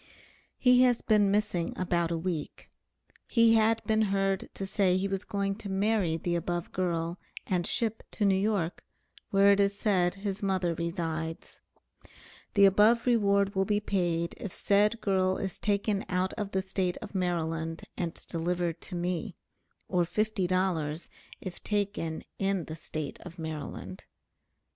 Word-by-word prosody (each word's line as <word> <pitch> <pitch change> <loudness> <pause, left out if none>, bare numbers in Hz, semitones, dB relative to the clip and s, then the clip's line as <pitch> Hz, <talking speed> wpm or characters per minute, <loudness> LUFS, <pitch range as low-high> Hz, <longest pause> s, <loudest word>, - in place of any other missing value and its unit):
He 250 -1 +5
has 245 -2 +3
been 210 -2 +4
missing 200 -4 0
about 175 -2 0
a 170 - -1
week; 165 -3 -4 0.6
he 230 -1 +5
had 225 0 +3
been 220 0 +2
heard 195 -2 0
to 195 - -4
say 190 -2 +2
he 190 +1 0
was 195 0 -2
going 200 -1 -1
to 205 - -7
marry 195 -4 +1
the 175 +1 -2
above 175 0 -2
girl 170 -1 -1 0.3
and 180 -2 0
ship 225 -2 -1
to 210 - 0
New 195 - +5
York, 195 -3 0 0.5
where 200 0 +5
it 200 - +3
is 200 0 +2
said 185 -4 +2
his 195 0 -4
mother 190 -3 +1
resides. 165 -1 -4 0.9
The 200 -1 +7
above 210 +4 +5
reward 200 -4 +3
will 190 -1 +2
be 205 +1 +1
paid 175 -5 -1
if 205 - -6
said 210 +5 +2
girl 190 -1 +2
is 195 -2 -4
taken 200 0 0
out 185 +1 0
of 210 -3 -3
the 190 -1 -1
State 190 -1 -1
of 215 - -9
Maryland 165 -3 -2
and 170 -2 -3
delivered 170 0 -2
to 180 - -7
me; 180 +2 -2 0.5
or 180 -2 +2
fifty 210 +1 0
dollars 175 -4 -1 0.3
if 185 -2 -8
taken 200 -6 -2 0.2
in 195 -3 0
the 155 - -6
State 155 -1 -6
of 170 - -11
Maryland. 150 - -6
190 Hz, 155 wpm, -29 LUFS, 170-205 Hz, 0.9 s, The